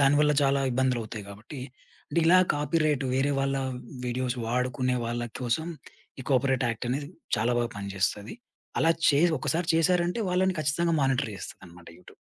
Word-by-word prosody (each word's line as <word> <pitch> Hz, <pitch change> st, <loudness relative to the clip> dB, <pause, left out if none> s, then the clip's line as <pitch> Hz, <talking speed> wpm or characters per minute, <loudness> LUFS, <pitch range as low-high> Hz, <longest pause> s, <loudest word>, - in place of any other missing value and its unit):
దానివల్ల 145 Hz, +2 st, +4 dB
చాలా 140 Hz, 0 st, +3 dB
ఇబ్బందులవుతాయి 120 Hz, -5 st, -1 dB
గాబట్టి 110 Hz, +7 st, -9 dB, 0.5 s
అంటే -, -, -1 dB
ఇలా 180 Hz, +2 st, +7 dB, 0.2 s
కాపీరైట్ 150 Hz, -1 st, +1 dB
వేరే 135 Hz, +2 st, +2 dB
వాళ్ళ 135 Hz, 0 st, 0 dB, 0.5 s
వీడియోస్ 125 Hz, 0 st, -1 dB
వాడుకునే 125 Hz, +1 st, 0 dB
వాళ్ళ 120 Hz, +1 st, -2 dB, 0.2 s
కోసం 125 Hz, +7 st, -1 dB, 0.5 s
ఈ -, -, -5 dB
కాపిరైట్ 130 Hz, 0 st, +2 dB
యాక్టనేది 125 Hz, +5 st, -3 dB, 0.3 s
చాలా 115 Hz, +2 st, +1 dB
బాగా 120 Hz, 0 st, -1 dB
పని 100 Hz, -1 st, -5 dB
జేస్తది. 100 Hz, -, -1 dB, 0.5 s
అలా 165 Hz, -, +4 dB, 0.2 s
చేసి 160 Hz, +4 st, +4 dB
ఒకసారి 165 Hz, +6 st, -1 dB
చేశారంటే 175 Hz, +4 st, +2 dB
వాళ్ళని 185 Hz, +1 st, +2 dB
ఖచ్చితంగా 165 Hz, +3 st, +1 dB
మానిటర్ 135 Hz, -3 st, +1 dB
చేస్తదనమాట 90 Hz, -1 st, -11 dB
యూట్యూబ్. -, -, -17 dB
135 Hz, 140 wpm, -27 LUFS, 120-155 Hz, 0.5 s, ఇలా